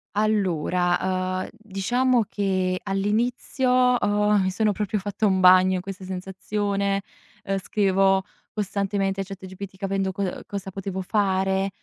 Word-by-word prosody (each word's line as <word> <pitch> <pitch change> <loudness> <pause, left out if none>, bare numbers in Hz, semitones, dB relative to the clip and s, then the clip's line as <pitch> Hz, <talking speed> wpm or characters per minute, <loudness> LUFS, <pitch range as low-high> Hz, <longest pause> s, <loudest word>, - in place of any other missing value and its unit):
Allora, 185 -2 +1
uhm, - - -8
diciamo 225 +4 0
che 185 -2 0
all'inizio, 245 +5 +1
uhm, 205 0 +2
mi 190 - +1
sono 210 +2 +1
proprio 210 +1 -2
fatta 205 +2 -1
un 190 -1 +2
bagno 185 0 +6
in 180 - -2
questa 190 0 -8
sensazione, 195 +1 -2 0.4
uhm, 195 0 -1
scrivevo 195 -1 +2 0.3
costantemente 195 -1 -1
a - - -1
ChatGPT 190 0 -9
capendo 195 0 -1
co 190 -1 -3
cosa 195 -1 -5
potevo 190 0 -4
fare. 195 -1 +1
195 Hz, 125 wpm, -24 LUFS, 190-205 Hz, 0.4 s, bagno